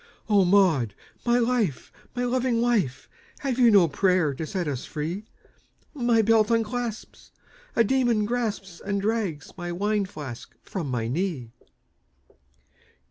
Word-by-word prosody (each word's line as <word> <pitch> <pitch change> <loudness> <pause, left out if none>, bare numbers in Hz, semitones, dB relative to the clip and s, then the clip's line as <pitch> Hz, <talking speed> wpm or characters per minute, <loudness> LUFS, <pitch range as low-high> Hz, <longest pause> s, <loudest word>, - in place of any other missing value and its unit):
"O 205 -3 +4
Maud, 170 - +3 0.3
my 240 0 +4
life! 230 - 0 0.2
my 245 - -1
loving 245 -1 +1
wife! 220 - 0 0.3
Have 265 -3 -1
you 240 -2 +7
no 200 -6 +6
prayer 180 -1 +2
to 155 +4 -5
set 185 -3 -2
us 135 -4 -3
free? 165 +7 -4 0.7
My 240 -5 +2
belt 220 0 +4
unclasps, 230 0 -2 0.5
a 230 - +5
demon 240 -2 +2
grasps 210 -6 -3
And 200 0 -1
drags 200 -8 -2
my 175 -1 -4
wine 205 +3 0
flask 145 -10 -9
from 170 -8 -4
my 120 -3 -1
knee!" 140 -4 -2
200 Hz, 135 wpm, -26 LUFS, 165-230 Hz, 0.7 s, you